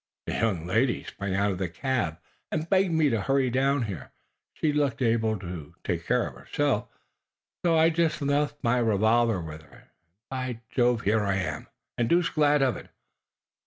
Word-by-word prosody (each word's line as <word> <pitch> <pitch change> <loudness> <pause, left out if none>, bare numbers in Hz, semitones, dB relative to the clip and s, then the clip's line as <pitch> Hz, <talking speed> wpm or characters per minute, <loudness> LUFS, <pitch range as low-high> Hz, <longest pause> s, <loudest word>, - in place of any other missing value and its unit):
The - - -3
young 95 -8 0
lady 115 +8 +1
sprang 100 -1 -4
out 100 +1 +2
of 90 - -4
the 95 -3 -1
cab 105 - -1 0.3
and 160 +1 -2
begged 190 0 +3
me 160 -3 +3
to 115 -3 0
hurry 135 +2 +1
down 135 +1 +2
here. 95 -9 -6 0.4
She 155 -2 0
looked 145 -5 0
able 115 -3 +1
to 90 -5 -8
take - - -3
care - - +2
of - - -6
herself, - - -1 0.8
so 170 -2 +3
I 160 +1 +5
just 165 -1 +1
left 145 +1 +1
my 120 +1 +2
revolver 110 -1 +3
with 80 -2 -7
her, 80 - -21
and, - - -20 0.4
by 130 -3 -4
Jove, 120 -2 +2
here 110 +1 +2
I 100 -1 +1
am 95 - -3 0.3
and 115 - +1
deuced 175 0 +2
glad 150 -2 +3
of 130 -2 +1
it. - - -12
120 Hz, 185 wpm, -27 LUFS, 100-145 Hz, 0.8 s, I